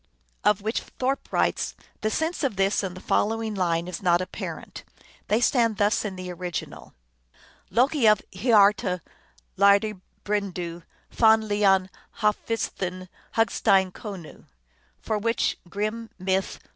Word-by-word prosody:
Of 210 -1 +3
which 220 +2 -1 0.2
Thorpe 265 +2 -1
writes, - - 0
" - - -35
The 215 - +1
sense 320 +7 -1
of 265 -7 0
this 195 +1 +2
and 185 -2 -5
the - - -9
following 225 0 0
line 175 -3 0
is 180 - -5
not 175 -2 +3
apparent. 185 0 -6 0.4
They 215 - +2
stand 235 -3 +2
thus 205 +2 +2
in 205 -3 -4
the 185 -1 -6
original: 175 -1 -6 0.7
Loki 250 - +3
of 210 -1 +6
hiarta 200 -3 +3 0.6
lyrdi 200 0 +4 0.2
brendu, 180 -5 -3 0.3
fann 220 -1 +5
liann 200 -3 +3 0.3
halfsvidthin 190 -4 -1 0.3
hugstein 195 -4 +3
konu, 190 -5 -9 0.5
for 215 -1 -2
which 230 +2 0
Grimm 215 +4 -3
(Myth. 190 0 -1
205 Hz, 130 wpm, -25 LUFS, 185-220 Hz, 0.7 s, of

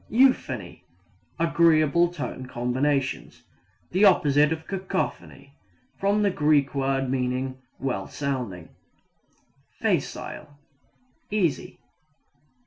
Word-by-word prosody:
Euphony 145 - +1 0.5
agreeable 165 0 +3
tone 130 -7 -6
combinations; 130 +3 -1 0.5
the 185 +4 +2
opposite 150 -6 +5
of 160 0 -3
cacophony. 185 -7 -4 0.5
(From 205 +2 +2
the 200 - +3
Greek 150 -4 +2
word 135 -1 0
meaning 130 0 -2 0.2
well 125 -8 -3
sounding.) 125 - -4 1.1
Facile 145 -1 -3 0.7
easy. 180 -11 -1
145 Hz, 80 wpm, -25 LUFS, 130-170 Hz, 1.1 s, opposite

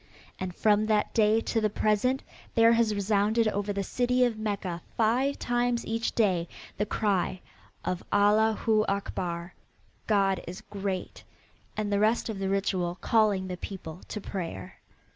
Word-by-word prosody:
And 185 -2 -4
from 215 0 +3
that 215 -1 +1
day 220 0 +4
to 225 - -1
the 215 - +2
present 215 +6 +1 0.3
there 230 0 +6
has 230 -2 +3
resounded 210 +3 +2
over 205 0 -2
the 200 0 -2
city 250 +4 +2
of 240 -2 0
Mecca 200 -5 -3 0.2
five 250 +5 +2
times 240 0 0
each 225 +1 -2
day 185 -6 +2 0.3
the 210 - -1
cry 195 -3 0 0.5
of 180 -1 -2
"Allah 215 +2 +4
Hu 215 -2 +3
Akbar" 175 -3 -3 0.5
God 195 -3 +2
is 180 +2 -7
great, 195 -2 -5 0.5
and 210 -1 -1
the 200 - +2
rest 220 +3 +2
of 210 -3 -4
the 195 0 -1
ritual 185 -3 0
calling 210 -4 +2
the 180 -1 -5
people 180 -3 -7
to 210 - -5
prayer. 170 - -6
210 Hz, 155 wpm, -28 LUFS, 190-225 Hz, 0.5 s, there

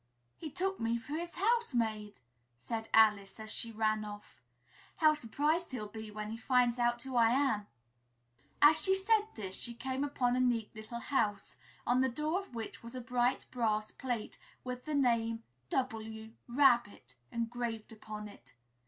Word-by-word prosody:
"He 320 - -6
took 380 +5 -2
me 230 +1 +1
for 235 +5 -8
his 340 +2 -4
housemaid!" 235 - 0 0.4
said 220 - -4
Alice, 210 -2 +4
as 220 0 -5
she 230 - -3
ran 215 -1 +1
off. 205 0 -10 0.6
"How 310 -1 +6
surprised 300 +5 0
he'll 230 -4 -3
be 220 +1 -8
when 210 0 -5
he 225 - -4
finds 245 0 +2
out 240 0 +2
who 265 -1 -6
I 230 -1 +6
am!" 235 -5 +2 1.0
As 310 +2 +8
she 380 0 +4
said 425 +2 +3
this, 195 -4 -5
she 235 +4 -4
came 260 +3 -2
upon 250 -4 +1
a - - +1
neat 240 -4 +1
little 220 +2 -7
house, 205 -8 0 0.3
on 250 +1 +3
the 265 - +3
door 305 +8 -1
of 390 -11 -11
which 225 -1 -6
was 235 +2 -9
a - - -3
bright 245 +1 +1
brass 215 -3 0
plate 245 -5 -4 0.2
with 250 0 -5
the 305 -1 -2
name 230 -4 +2 0.3
"W. 220 -3 -3 0.2
RABBIT" 240 - +3 0.2
engraved 235 -1 -3
upon 215 -1 -7
it. 205 - -15
235 Hz, 165 wpm, -33 LUFS, 220-270 Hz, 1.0 s, As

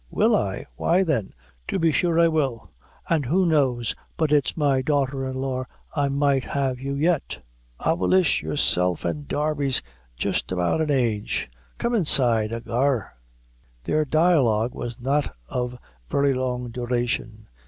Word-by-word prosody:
"Will - - +3
I? - - -2
Why, 180 +3 +3
then, 135 - -1 0.4
to - - -1
be 165 -3 +3
sure 170 +1 +2
I 170 - +6
will; 140 -8 -1 0.4
an' 165 -3 +2
who 170 +8 +1
knows 130 -8 +1 0.2
but 160 -2 +1
it's 145 +1 +2
my 140 -4 +2
daughter 135 -1 0
in 130 - -4
law 130 -1 -2 0.3
I 145 -2 +1
might 140 -1 +2
have 135 -3 -1
you 140 +1 -3
yet, 160 +2 0 0.4
avillish! 175 +2 +2
Yourself 90 - +1
and 145 -2 -3
Darby's 145 -3 0 0.3
jist - - -2
about 90 - +1
an 155 - -1
age. 115 - 0 0.3
Come 235 - -1
inside, 125 - +3
ahagur." 115 +1 -1 0.7
Their 155 0 +1
dialogue 135 -8 +2
was 120 +1 -6
not 140 - 0
of 125 0 -3 0.3
very 140 -1 +2
long 125 -2 -2
duration. 120 -3 -2
135 Hz, 145 wpm, -24 LUFS, 120-155 Hz, 0.7 s, I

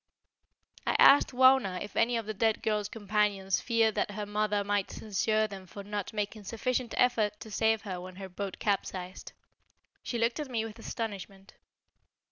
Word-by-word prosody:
I - - +2
asked 285 - +7
Wauna 255 -7 +4
if 205 - -8
any 235 +1 +2
of 225 - -3
the 215 - -4
dead 220 +1 +1
girl's 210 -1 0
companions 205 -3 0
feared 225 -2 +2
that - - -1
her 205 0 -4
mother 205 0 0
might 200 -1 0
censure 215 +1 0
them 195 -3 -8
for 200 +3 -9
not 205 -1 -4
making 210 0 -4
sufficient 245 +2 -2
effort 215 -4 +2
to 220 - -9
save 220 +1 +1
her 185 -4 -5
when 185 0 -9
her 190 0 -7
boat 190 +1 -5
capsized. 190 -3 -3 0.7
She 240 - -3
looked 230 +4 0
at 295 -3 -4
me 225 -3 -1
with 225 +1 -9
astonishment. 200 -4 -6
210 Hz, 170 wpm, -30 LUFS, 200-225 Hz, 0.7 s, asked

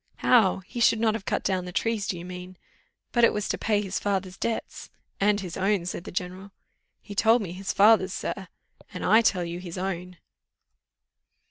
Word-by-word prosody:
"How? 205 -6 +3
he 240 - -7
should 230 -1 +4
not 220 -1 +2
have 215 -3 -5
cut - - -1
down 185 -2 0
the 180 - -6
trees, 220 +2 -1
do 185 - -2
you 170 - -8
mean? 180 0 -9 0.5
but 240 - +2
it 235 - +7
was 210 -1 -2
to - - 0
pay 210 -2 +1
his 195 -1 -3
father's 190 -2 -2
debts 230 +2 -4 0.2
" - - -23
"And 205 +1 +3
his 180 -2 -6
own," 195 -1 +1
said 175 0 -5
the - - -7
general. 185 +2 -5 0.5
"He 205 - -9
told 225 +3 +4
me 175 - -6
his 190 +2 -4
father's, 200 -2 +5
sir." 190 -2 -4 0.4
"And 185 - -5
I 220 +4 +6
tell 185 -5 +1
you 170 +1 -5
his 180 -1 -8
own." 180 -1 -4
195 Hz, 205 wpm, -26 LUFS, 180-210 Hz, 0.5 s, it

